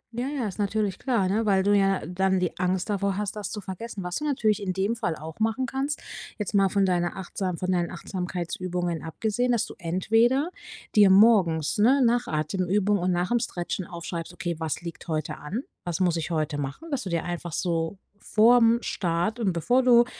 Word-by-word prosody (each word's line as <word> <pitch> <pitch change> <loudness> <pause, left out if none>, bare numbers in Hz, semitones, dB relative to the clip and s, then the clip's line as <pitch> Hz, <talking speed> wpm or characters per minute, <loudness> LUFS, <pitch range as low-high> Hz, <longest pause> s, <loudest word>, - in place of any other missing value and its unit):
Ja, 245 +2 -2
ja, 275 -5 -2
ist 195 +1 -7
natürlich 205 -1 -1
klar, 235 -8 +1
ne, 215 +4 0
weil 190 -2 +3
du 205 +1 +4
ja 195 -3 +2
dann 190 +2 +1
die 180 -2 -1
Angst 180 0 0
davor 200 -2 -1
hast, 210 0 -3
das 210 -3 -4
zu 210 - -5
vergessen. 195 +2 -6
Was 180 0 -3
du 300 - -4
natürlich 220 -7 +1
in 195 -2 -1
dem 195 +5 0
Fall 175 -7 -2
auch 160 +3 -9
machen 225 +4 +1
kannst 270 +4 -2 0.4
jetzt 210 -1 -4
mal 195 -1 +4
von 200 0 +2
deiner 175 -2 0
Achtsam 185 -1 -3
von 185 +2 -1
deinen 175 -2 +1
Achtsamkeitsübungen 175 -1 -3
abgesehen, 220 +9 -1
dass 235 - +1
du - - -9
entweder 225 - +2 0.4
dir 205 -2 +7
morgens, 190 -6 +4
ne, 260 +6 +5
nach 240 +1 +2
Atemübung 185 +6 0
und 180 +1 0
nach'm 180 +7 +1
Stretchen 175 -2 -4
aufschreibst: 170 -1 -6
„Okay, 175 -5 -3
was 160 0 -2
liegt 170 -1 -8
heute 155 -2 -2
an? 200 - -4 0.2
Was 175 -1 -3
muss 180 -3 +2
ich 165 -1 -3
heute 155 -3 -1
machen?” 145 - -6
Dass 275 -3 -1
du 190 - -5
dir 170 -2 -1
einfach 175 -1 -4
so 165 +2 -1 0.2
vor'm 230 +2 +4
Start 175 +3 -1
und 215 -5 +1
bevor 245 +10 +2
du, 240 -1 +6
190 Hz, 200 wpm, -26 LUFS, 175-220 Hz, 0.4 s, dir